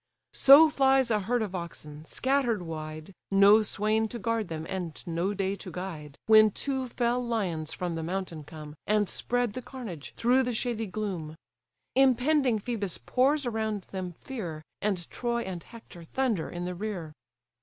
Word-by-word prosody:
So 285 +4 +9
flies 270 -4 +3
a 215 - +3
herd 230 +4 0
of 200 -3 -5
oxen, 155 -4 -7
scatter'd 250 - 0
wide, 155 +1 -7 0.2
No 200 +2 +7
swain 215 +1 +1
to 235 - -6
guard 230 -1 -1
them, 160 -1 -5
and 180 -5 -4
no 175 +4 -1
day 195 0 -1
to 185 - -8
guide, 160 -6 -7
When 215 0 +7
two 265 +4 -3
fell 245 0 0
lions 185 -10 -2
from 180 -2 -3
the 165 - -3
mountain 170 -2 -4
come, 150 -1 -10
And 210 -1 +3
spread 245 0 -1
the 255 - -5
carnage 225 - -8
through 250 +3 +4
the 250 -2 -1
shady 225 -1 -1
gloom. 180 -6 -4 0.6
Impending 265 -1 +3
Phœbus 205 -5 -3
pours 275 +3 +2
around 220 -4 -2
them 185 -2 -4
fear, 170 - -6 0.2
And 190 -5 -1
Troy 235 -1 -1
and 180 -3 -5
Hector 180 -7 -13
thunder 230 -4 -1
in 175 0 -5
the 180 - -3
rear. 180 -5 -5
210 Hz, 165 wpm, -28 LUFS, 175-240 Hz, 0.6 s, So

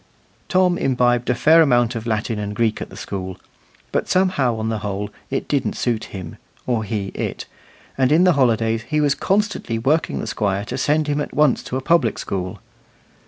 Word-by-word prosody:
Tom 185 -2 +3
imbibed 125 -2 +1
a 125 - +3
fair 160 +7 +6
amount 120 -5 +3
of 115 -1 -5
Latin 110 0 -1
and 105 0 -4
Greek 110 0 0
at - - -5
the - - -12
school, 95 -2 -5 0.5
but - - -1
somehow, 180 -10 +2
on 110 0 -2
the 110 -1 -2
whole, 105 0 -4 0.2
it 135 - -2
didn't 140 -3 0
suit 115 -3 -1
him, 90 -4 -8 0.3
or 120 -3 0
he 100 -2 -3
it, - - -4 0.5
and 130 +1 +3
in 165 +4 +5
the 180 -1 +5
holidays 115 -5 +2
he 150 - +1
was 145 -2 +3
constantly 200 - -1
working 145 +8 +1
the - - -3
Squire 100 -1 -1
to - - -5
send 150 +3 +2
him 145 0 0
at - - -6
once 150 -4 +3
to 130 - -4
a - - -3
public 140 -7 +2
school. 90 -2 -4
120 Hz, 195 wpm, -21 LUFS, 110-150 Hz, 0.5 s, fair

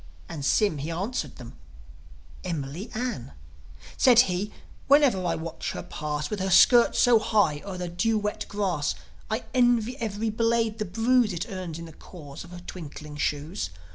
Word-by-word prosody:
And 155 -4 -6
Sym, 195 +1 +2
he 150 +4 -4
answered 175 - -3
them, 120 -2 -11 0.9
"Emily 165 - -4
Ann." 225 - -4 0.6
Said 245 -2 +7
he: 190 0 -2 0.4
"Whenever 275 -9 +5
I 175 - 0
watch 165 0 -5
her - - -5
pass, 150 -2 -4
With 210 - -2
her 190 +1 -1
skirts 235 +6 +6
so 240 -2 +6
high 205 -9 +2
o'er 195 -2 -6
the 180 0 -4
dew 215 +6 0
wet 210 0 -3
grass, 185 -8 -1 0.3
I 220 +3 -1
envy 245 -1 +3
every 220 -1 -2
blade 230 0 +1
the 215 - -1
bruise 225 +3 +2
It 175 - -3
earns 180 -4 -5
in 170 - -7
the 165 - -11
cause 145 -5 -11
of 170 - -13
her 175 0 -10
twinkling 150 -3 -8
shoes. 145 - -2
190 Hz, 170 wpm, -26 LUFS, 160-225 Hz, 0.9 s, Said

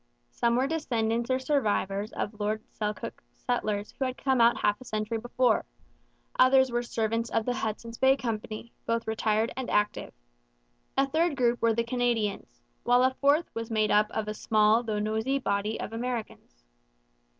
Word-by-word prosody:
Some 235 0 +1
were 255 +2 +2
descendants 235 -6 -1
or 255 - +3
survivors 215 -7 0
of 210 0 -4
Lord 215 +1 -1
Selkirk's 210 - -5
settlers 205 - -2
who 270 - -2
had 255 0 -3
come 265 -3 +1
out 235 +1 +5
half 210 +2 0
a - - -8
century 215 -1 -3
before; 245 +2 +1 0.8
others 260 0 +5
were 240 0 0
servants 230 0 -1
of 225 -1 0
the 245 - 0
Hudson's 230 -1 -4
Bay 265 +1 +5
Company, 225 -1 -5
both 230 0 0
retired 220 0 0
and 260 -1 -4
active; 210 0 0 0.9
a 270 - +4
third 320 +2 +1
group 240 -2 +1
were 230 -1 +3
the 235 - +1
Canadians; 225 - -2 0.2
while 245 +1 +4
a 260 0 +3
fourth 290 +4 +3
was 230 0 -5
made 215 -2 +1
up 210 0 +4
of 220 -1 -3
a 210 - -2
small 215 +1 +3
though 220 -3 -3
noisy 220 +6 0
body 210 -3 -1
of 220 - -5
Americans. 225 - -5
230 Hz, 170 wpm, -28 LUFS, 215-250 Hz, 0.9 s, out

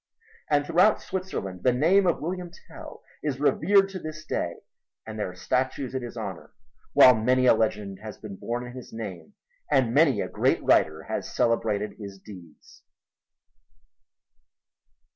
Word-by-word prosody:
And 145 -1 +2
throughout 180 +7 +4
Switzerland 100 - -5
the 125 - +3
name 175 +10 +3
of 170 - +1
William 180 +2 -4 0.2
Tell - - -11 0.2
is 140 -3 -3
revered 195 +7 +3
to 190 -1 -6
this 155 -1 -8
day 85 - -2 0.5
and 110 -1 -7
there 105 - -2
are 90 - -11
statues 130 +6 -2
in 130 - -2
his 120 0 -8
honor, 100 -6 -7 0.4
while 130 -3 +8
many 125 +3 +2
a - - +7
legend 105 -3 -1
has 110 -1 -9
been 105 -3 -9
born 120 +5 -4
in 120 - -9
his 130 -1 -10
name 110 - -8 0.3
and 120 -3 +2
many 140 -6 +4
a - - -1
great - - 0
writer 80 +1 +3
has - - -5
celebrated 110 -3 0
his 100 -2 -8
deeds. 90 -6 -15
125 Hz, 155 wpm, -26 LUFS, 105-155 Hz, 0.5 s, while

